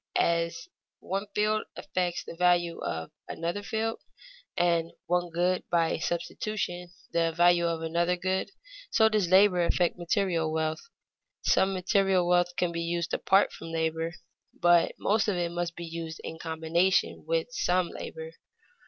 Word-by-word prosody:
As 170 - 0 0.3
one 195 +2 -3
field 215 +1 +1
affects 180 -1 -2
the - - -9
value 175 -1 +2
of 80 0 -4 0.2
another 170 +5 -3
field, 220 +2 -2 0.6
and 170 -1 +1
one 175 0 0
good, 180 +2 0
by 165 -2 +1
substitution, 175 +1 -3 0.2
the 165 -1 +1
value 175 +1 +4
of 165 -1 -2
another 170 +2 +1
good, 185 +1 -1 0.4
so 220 -1 +4
does 210 -5 +1
labor 185 -1 +5
affect 175 +1 +1
material 175 -3 0
wealth. 160 - -2 0.5
Some 190 - +3
material 190 -1 +2
wealth 175 0 +2
can 180 -1 +1
be 170 0 -3
used 170 0 -2
apart 195 +1 +3
from - - -9
labor, 165 +1 -2 0.4
but 175 -1 +4
most 215 +2 +1
of 205 - +1
it 175 -1 -1
must 170 -1 -3
be 170 - -6
used 165 0 -6
in 160 - -7
combination 165 +3 +1
with - - 0
some 180 - +1
labor. 480 0 -7
175 Hz, 145 wpm, -28 LUFS, 170-190 Hz, 0.6 s, labor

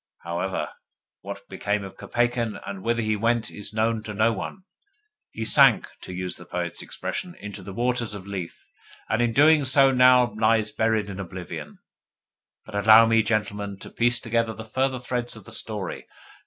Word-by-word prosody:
However, 85 +3 -2 0.5
what - - -8
became 105 0 -2
of 95 - -9
Kopeikin, 120 -2 -1
and 100 -1 -6
whither 115 +2 0
he 110 0 +1
went, 115 +1 0
is 105 0 -8
known 110 +1 0
to 105 -1 -7
no 110 +3 +3
one. 185 - -6 0.7
He 110 - -5
sank, 110 - +6
to - - -8
use 90 0 -4
the 90 - -12
poet's 85 0 -4
expression, 180 -1 -5
into 105 -1 -8
the 95 - -8
waters 120 0 -1
of 95 -2 -8
Lethe, 95 -4 -5 0.5
and 110 - +1
his 115 -1 +1
doings 145 -2 +5
now 125 -4 +6
lie 110 +1 +3
buried 110 -2 +1
in 100 -1 -7
oblivion. 90 -3 -7 0.9
But 110 - -12
allow 110 +2 +7
me, 115 0 +4
gentlemen, 105 -2 -2
to - - -11
piece 120 0 +3
together 115 -1 0
the 110 - -8
further 130 +4 0
threads 120 -1 -3
of - - -12
the 120 - -10
story. 105 -4 -5
110 Hz, 170 wpm, -25 LUFS, 100-120 Hz, 0.9 s, allow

